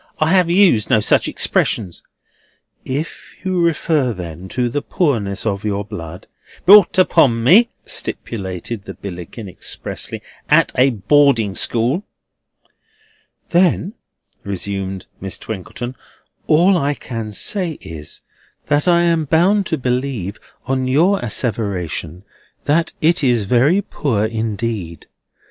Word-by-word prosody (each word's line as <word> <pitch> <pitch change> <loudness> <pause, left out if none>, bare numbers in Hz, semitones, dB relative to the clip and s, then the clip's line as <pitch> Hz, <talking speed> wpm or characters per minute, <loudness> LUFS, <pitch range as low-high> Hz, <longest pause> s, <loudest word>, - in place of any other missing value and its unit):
"I 155 +1 +2
have 185 -3 +4
used 175 - +4
no 110 - +4
such 105 - +2
expressions." 95 -6 -1 0.8
"If 145 +5 -5
you 185 -2 0
refer, 155 -6 +1
then, 90 -1 -8
to 125 +3 -1
the 145 +5 -2
poorness 115 - -1
of 100 -2 -1
your 100 -1 -2
blood—" 85 -3 -8 0.4
"Brought 195 0 +7
upon 140 -10 +4
me," 205 - +6 0.2
stipulated 100 0 -4
the - - -8
Billickin, 95 +3 -8
expressly, 90 - -5 0.3
"at - - +4
a 130 +2 +4
boarding 120 -1 +3
school—" 120 - +1 1.5
"Then," 180 +2 +2 0.5
resumed 95 -1 -4
Miss 95 0 -5
Twinkleton, 110 +4 -6 0.5
"all 175 +4 +4
I 145 0 0
can 115 -4 -6
say 180 - -1
is, 80 - -9 0.4
that 145 +3 +1
I 170 -1 +4
am 165 -2 +2
bound 185 +7 +3
to 160 - -1
believe, 125 -6 -2 0.3
on 130 0 -1
your 170 +10 +3
asseveration, 100 -6 -3 0.4
that 160 +3 +1
it 165 0 +3
is 120 -5 +3
very 135 - +3
poor 115 - -1
indeed. 110 -5 -3
120 Hz, 120 wpm, -18 LUFS, 100-160 Hz, 1.5 s, Brought